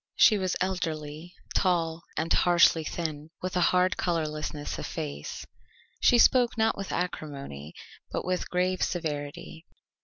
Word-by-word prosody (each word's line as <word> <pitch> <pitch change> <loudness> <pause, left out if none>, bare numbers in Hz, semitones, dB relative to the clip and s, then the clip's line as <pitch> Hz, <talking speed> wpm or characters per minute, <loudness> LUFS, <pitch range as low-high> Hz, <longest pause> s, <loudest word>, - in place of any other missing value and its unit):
She 215 -4 +6
was 185 -1 -1
elderly, 165 -3 -3 0.2
tall, 170 -3 +1 0.2
and 160 +1 +1
harshly 170 -2 +5
thin, 155 -1 -4
with 185 0 -4
a 180 - +2
hard 180 0 +2
colourlessness 155 -3 -2
of - - -4
face. 70 +1 -5 0.5
She 245 - +5
spoke 245 0 +5
not 220 0 +2
with 195 0 -5
acrimony, 140 - -5 0.4
but - - -3
with 185 0 -2
grave 180 +1 0
severity. 160 0 -4
170 Hz, 130 wpm, -28 LUFS, 150-185 Hz, 0.5 s, She